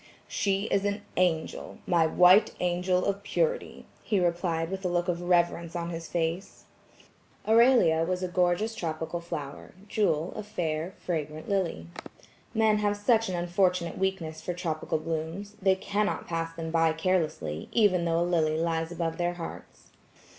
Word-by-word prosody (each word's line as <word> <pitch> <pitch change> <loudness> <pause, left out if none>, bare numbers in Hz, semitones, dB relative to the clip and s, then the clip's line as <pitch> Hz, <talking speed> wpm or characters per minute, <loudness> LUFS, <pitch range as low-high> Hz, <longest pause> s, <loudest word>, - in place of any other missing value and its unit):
"She 195 -1 0
is 195 - +2
an 205 0 -2
angel, 175 -3 -1
my 170 -2 +3
white 180 +5 +5
angel 180 +1 +1
of 200 0 -1
purity," 485 - -1 0.2
he 205 - 0
replied 170 -1 0
with 195 0 -4
a - - +1
look 175 0 0
of 175 -1 -1
reverence 170 -1 +1
on 170 0 -3
his 165 -1 -6
face. 170 +2 -3 0.8
Aurelia 225 -8 +5
was 180 +2 -2
a - - 0
gorgeous 180 +5 +1
tropical 165 -3 -3
flower; 155 -5 -7
Jewel, 185 -6 0
a - - -4
fair 175 -4 -3
fragrant 155 -2 -4
lily. 185 - -1 0.7
Men 220 -1 +3
have 205 0 +1
such 225 0 +2
an 185 - -2
unfortunate 175 0 0
weakness 185 -5 -2
for 180 - -4
tropical 160 -3 -2
blooms, 165 +6 -4
they 190 0 +4
cannot 205 +2 -1
pass 165 -1 -2
them 165 -1 -5
by 165 -1 +3
carelessly, 160 - -1
even 190 -7 +3
though 165 0 +1
a - - +2
lily 160 -3 +1
lies 165 0 -1
above 165 -1 -2
their 175 0 0
hearts. 170 -1 -9
175 Hz, 155 wpm, -28 LUFS, 165-195 Hz, 0.8 s, white